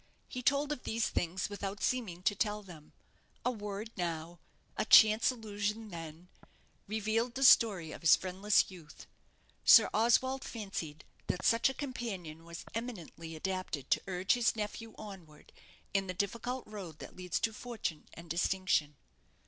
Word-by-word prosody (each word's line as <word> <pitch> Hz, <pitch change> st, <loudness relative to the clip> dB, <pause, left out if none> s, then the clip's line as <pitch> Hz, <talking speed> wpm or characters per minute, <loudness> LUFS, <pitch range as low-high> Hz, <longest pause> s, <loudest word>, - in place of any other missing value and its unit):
He 255 Hz, -, -5 dB
told 280 Hz, +3 st, +2 dB
of 295 Hz, -, -3 dB
these 225 Hz, 0 st, -1 dB
things 175 Hz, +2 st, -1 dB
without 200 Hz, 0 st, -5 dB
seeming 205 Hz, -9 st, -1 dB
to 205 Hz, -, +3 dB
tell 210 Hz, +1 st, -1 dB
them; 160 Hz, -6 st, -13 dB, 0.5 s
a 250 Hz, -, +3 dB
word 210 Hz, -1 st, -6 dB
now, 170 Hz, -1 st, -4 dB, 0.4 s
a -, -, 0 dB
chance 215 Hz, +1 st, +7 dB
allusion 215 Hz, -2 st, -3 dB
then, 165 Hz, -1 st, -8 dB, 0.6 s
revealed 220 Hz, +3 st, -1 dB
the 270 Hz, -, 0 dB
story 200 Hz, -11 st, +6 dB
of -, -, -9 dB
his 165 Hz, -, +7 dB
friendless 190 Hz, +2 st, +1 dB
youth. 170 Hz, -5 st, -12 dB, 0.6 s
Sir -, -, +8 dB
Oswald 260 Hz, +4 st, +3 dB
fancied 195 Hz, -9 st, -6 dB, 0.2 s
that 180 Hz, -, -2 dB
such 230 Hz, +3 st, +4 dB
a 265 Hz, -, -5 dB
companion 195 Hz, -, -5 dB
was 170 Hz, -1 st, -8 dB
eminently 175 Hz, -8 st, -6 dB
adapted 185 Hz, -5 st, -4 dB
to -, -, +4 dB
urge 185 Hz, 0 st, +1 dB
his 240 Hz, -2 st, +2 dB
nephew 220 Hz, +1 st, -5 dB
onward 185 Hz, -8 st, -11 dB, 0.4 s
in 195 Hz, -1 st, +1 dB
the 185 Hz, -, -4 dB
difficult 235 Hz, +6 st, -2 dB
road 195 Hz, -7 st, -8 dB
that -, -, -10 dB
leads 180 Hz, -1 st, -2 dB
to 225 Hz, -1 st, 0 dB
fortune 215 Hz, -9 st, -5 dB
and 170 Hz, +1 st, -11 dB
distinction. 170 Hz, -3 st, +1 dB
200 Hz, 150 wpm, -33 LUFS, 175-225 Hz, 0.6 s, Sir